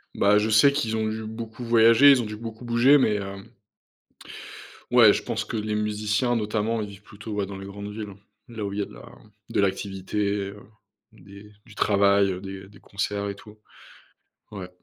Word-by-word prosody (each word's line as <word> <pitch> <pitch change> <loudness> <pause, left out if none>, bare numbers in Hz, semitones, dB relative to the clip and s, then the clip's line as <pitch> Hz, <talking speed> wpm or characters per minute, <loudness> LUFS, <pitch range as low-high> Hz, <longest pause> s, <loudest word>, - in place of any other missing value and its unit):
Bah, 105 +1 +4
je 110 +1 -1
sais 110 +7 +6
qu'ils 115 -6 -1
ont 110 0 -1
dû 110 0 -4
beaucoup 110 +2 -7
voyager, 115 +3 +6
ils 130 -3 +4
ont - - -4
dû 105 0 -6
beaucoup 115 +2 -9
bouger, 120 +5 +5
mais 110 -6 +2
hem 100 -1 -6 1.5
ouais, - - +7
je - - -2
pense - - -3
que - - -6
les 105 0 -2
musiciens 105 +3 0
notamment, 110 +1 -1
ils 105 - -4
vivent 100 0 -14
plutôt, 105 +1 -9
ouais, 100 -1 -1
dans 95 0 -8
les 95 - -8
grandes 100 +1 -8
villes, 105 -2 -7 0.3
là 110 -3 -6
où 100 - -4
il 105 - -4
y - - +1
a - - -1
de - - -15
la - - -13 0.4
de - - -1
l'activité, 100 +1 -2
heu, 105 - -11 0.5
des 100 +2 -15
du 115 -4 -16
travail, 100 -1 +3
heu, 90 - -5
des 95 0 -8
des 100 - -18
concerts 100 0 -3
et 100 - -5
tout. 105 +1 -16 0.9
Ouais. 95 -3 -7
105 Hz, 200 wpm, -25 LUFS, 100-110 Hz, 1.5 s, ouais